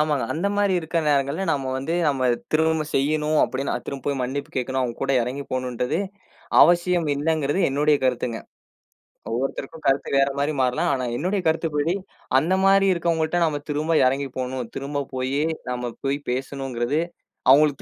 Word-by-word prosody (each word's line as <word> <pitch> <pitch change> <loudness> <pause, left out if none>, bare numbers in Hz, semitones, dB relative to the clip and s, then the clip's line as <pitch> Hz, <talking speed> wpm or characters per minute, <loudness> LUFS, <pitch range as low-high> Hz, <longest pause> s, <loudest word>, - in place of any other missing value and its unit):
ஆமாங்க. 150 -3 +1
அந்த 170 +5 -1
மாரி 205 -1 +2
இருக்க 165 +1 -2
நேரங்கள்ல, 140 +5 +1
நாம 135 -3 -2
வந்து 135 +6 -2
நாம 135 -3 +1 0.3
திரும்பச் 160 -1 +1
செய்யணும், 150 +2 +1
அப்டின்னு 135 +1 -2
திரும்ப 140 -2 -6
போய் 140 -2 0
மன்னிப்பு 140 +3 -3
கேட்கணும், 130 +1 -1
அவுங்க 120 -2 -3
கூட 135 0 +1
எறங்கி 130 +4 -4
போகணும்றதே 125 +4 -1 0.6
அவசியம் 175 -1 +3
இல்லைங்கறது 150 +1 0
என்னுடைய 145 +2 +3
கருத்துங்க. 125 -2 0 0.9
ஒவ்வொருத்தருக்கும் 135 +5 -4
கருத்து 135 +1 +1
வேற 135 0 +4
மாரி 145 +2 0
மாறலாம். 125 -1 +1
ஆனா 130 -2 -1
என்னுடைய 190 +4 0
கருத்துப்படி, 160 0 +1 0.4
அந்த 160 +7 +2
மாரி 195 0 +5
இருக்கவங்கள்ட 170 -1 0
நாம 150 -3 -1
திரும்ப 155 +3 0
எறங்கி 135 +2 0
போகணும், 125 -2 -3
திரும்பப் 140 0 -4
போயி 130 +3 -1 0.3
நாம 125 -1 -3
போய் 135 +1 +1
பேசணும்ங்கறது 135 +1 -2 0.5
அவுங்களுக்கு 145 0 +4
140 Hz, 150 wpm, -23 LUFS, 130-160 Hz, 0.9 s, மாரி